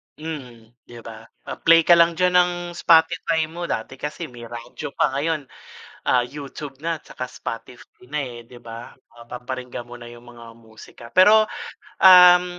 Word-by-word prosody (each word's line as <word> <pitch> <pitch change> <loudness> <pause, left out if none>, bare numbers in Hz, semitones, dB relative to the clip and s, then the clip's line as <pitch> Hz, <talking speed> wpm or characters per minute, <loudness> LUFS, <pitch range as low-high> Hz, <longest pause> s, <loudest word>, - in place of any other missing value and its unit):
Mhm, 125 -8 -9 0.2
di 120 - -11
ba? 115 0 -11 0.2
Ah, - - -7
play 165 0 +6
ka 175 - +6
lang 170 0 +4
diyan 180 0 +2
ng 180 0 +2 0.2
Spotify 165 -1 +2
mo. 170 +2 -7
Dati 110 - -4
kasi 150 +3 -5
may 120 -1 -11
radyo 120 +5 -8
pa, - - +2
ngayon, 155 +2 -2 0.7
ah, 125 - +4
YouTube 140 -1 -9
na 165 -1 -2
tsaka 125 - -8
Spotify 115 +2 -10
na, 150 - -1
eh, 120 -3 -7
di 120 +1 -15
ba? 115 0 -10 0.3
Mapaparinggan 125 +1 -8
mo 120 - -10
na 120 -1 -12
yung 120 0 -15
mga 115 -1 -13
musika. 115 0 -16
Pero, 215 +4 +6 0.6
um, 180 -1 +8
135 Hz, 160 wpm, -22 LUFS, 120-165 Hz, 0.7 s, um